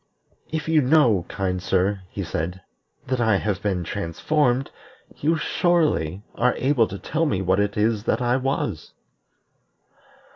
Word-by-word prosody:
"If 160 Hz, 0 st, -3 dB
you 160 Hz, -1 st, +4 dB
know, 125 Hz, -, +3 dB
kind 95 Hz, -1 st, -2 dB
sir," 95 Hz, +1 st, +1 dB
he 100 Hz, -, -5 dB
said, 90 Hz, +2 st, -4 dB, 0.4 s
"that 130 Hz, -1 st, -1 dB
I 110 Hz, -3 st, +3 dB
have 100 Hz, -1 st, -1 dB
been 95 Hz, -4 st, -1 dB
transformed, 125 Hz, -, 0 dB, 0.5 s
you 160 Hz, +3 st, +1 dB
surely 155 Hz, -, +1 dB
are 125 Hz, +1 st, +1 dB
able 130 Hz, -4 st, +2 dB
to 100 Hz, -, -7 dB
tell 160 Hz, -, -1 dB
me 95 Hz, -9 st, -1 dB
what 95 Hz, +1 st, +2 dB
it 100 Hz, 0 st, 0 dB
is 105 Hz, 0 st, +1 dB
that -, -, +1 dB
I 125 Hz, 0 st, +1 dB
was." 130 Hz, -, -3 dB
105 Hz, 145 wpm, -23 LUFS, 95-135 Hz, 0.5 s, you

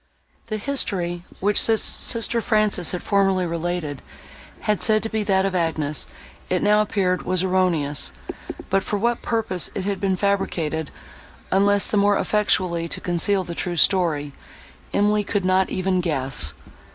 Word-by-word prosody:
The 215 Hz, -1 st, -3 dB
history, 180 Hz, -8 st, 0 dB
which 205 Hz, +2 st, +2 dB
sister 230 Hz, +1 st, +2 dB
Frances 215 Hz, -6 st, +2 dB
had 180 Hz, -, -3 dB
formerly 195 Hz, -3 st, +2 dB
related, 170 Hz, -4 st, -3 dB, 0.6 s
and -, -, -23 dB
had 210 Hz, -2 st, 0 dB
said 215 Hz, -1 st, +3 dB
to 225 Hz, -, -3 dB
be 220 Hz, -, -1 dB
that 195 Hz, -2 st, +1 dB
of 195 Hz, -, -1 dB
Agnes, 160 Hz, -4 st, 0 dB, 0.4 s
it 180 Hz, -, 0 dB
now 210 Hz, +1 st, +4 dB
appeared, 190 Hz, -3 st, 0 dB
was 185 Hz, 0 st, 0 dB
erroneous; 175 Hz, -, 0 dB, 0.6 s
but 195 Hz, 0 st, +3 dB
for 205 Hz, -, -2 dB
what 235 Hz, +3 st, 0 dB
purpose 220 Hz, -6 st, +1 dB
it 190 Hz, -, -3 dB
had 200 Hz, -1 st, -2 dB
been 190 Hz, -1 st, 0 dB
fabricated, 165 Hz, -6 st, -1 dB, 0.6 s
unless 200 Hz, +1 st, +3 dB
the 215 Hz, -, -1 dB
more 205 Hz, 0 st, +3 dB
effectually 185 Hz, -4 st, 0 dB
to -, -, -3 dB
conceal 185 Hz, +3 st, +1 dB
the 175 Hz, -1 st, -6 dB
true 175 Hz, 0 st, -3 dB
story, 155 Hz, -6 st, +2 dB, 0.6 s
Emily 210 Hz, +1 st, +2 dB
could 200 Hz, -2 st, -2 dB
not 185 Hz, 0 st, +2 dB
even 185 Hz, 0 st, 0 dB
guess. 130 Hz, -, -2 dB
190 Hz, 150 wpm, -22 LUFS, 175-205 Hz, 0.6 s, now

